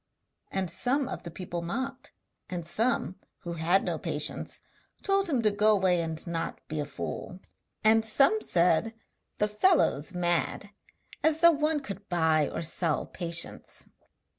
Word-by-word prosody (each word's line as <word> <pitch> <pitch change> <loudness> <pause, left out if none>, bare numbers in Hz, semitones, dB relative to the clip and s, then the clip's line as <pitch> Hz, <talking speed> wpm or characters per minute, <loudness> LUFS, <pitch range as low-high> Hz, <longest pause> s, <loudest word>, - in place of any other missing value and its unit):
And 190 -1 -1
some 255 - +1
of - - -5
the 170 - -8
people 175 0 -5
mocked, 260 +10 -4 0.4
and 175 -2 -4
some 190 - +1 0.2
(who 170 - -5
had 170 +4 +2
no - - -2
patience) - - -1 0.4
told 390 -1 +1
him 260 -6 +1
to 215 - +4
go 210 +1 +4
away 185 -3 +2
and 160 -1 -4
not 170 -1 -3
be 155 -1 -4
a 145 - -1
fool; 145 +5 -6 0.4
and 220 +1 +5
some 275 - +3
said: 180 - +2 0.4
'The 210 - +2
fellow's 210 - +2
mad! 175 +3 -1 0.5
As 315 0 +3
though 340 0 +9
one 305 0 0
could 200 -6 -8
buy 160 -4 +2
or 170 - -4
sell 165 -1 0
patience!' 170 -2 -2
190 Hz, 150 wpm, -28 LUFS, 170-250 Hz, 0.5 s, though